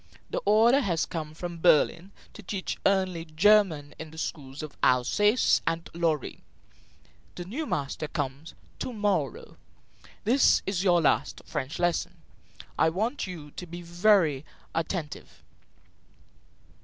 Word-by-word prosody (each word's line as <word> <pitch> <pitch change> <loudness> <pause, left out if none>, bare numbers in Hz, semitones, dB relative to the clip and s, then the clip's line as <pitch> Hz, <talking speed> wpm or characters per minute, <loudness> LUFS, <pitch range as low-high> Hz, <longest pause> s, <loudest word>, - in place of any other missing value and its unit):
The - - -1
order 225 +6 +5
has 175 - 0
come 155 -3 -6
from 170 0 -6
Berlin 170 +2 +3 0.2
to - - -11
teach 195 -1 -4
only 185 -4 +1
German 165 -3 +3
in 160 - -7
the 160 - -14
schools 140 -3 -5
of 155 - -8
Alsace 205 - +3
and 165 0 -1
Lorraine. 165 -4 -1 0.9
The 175 - -6
new 280 - -4
master 145 +2 -3
comes 145 +1 -5 0.2
to 255 - -4
morrow. 200 - -2 0.7
This 250 +6 +4
is 195 -2 -1
your 175 -3 +4
last 155 - +1
French 145 -2 -4
lesson. 175 -1 -1 0.6
I 160 - +5
want 215 - -2
you 160 -5 -8
to 180 - -8
be 175 +1 -8
very 170 -5 +3 0.3
attentive." 165 -1 -4
170 Hz, 130 wpm, -27 LUFS, 155-200 Hz, 0.9 s, order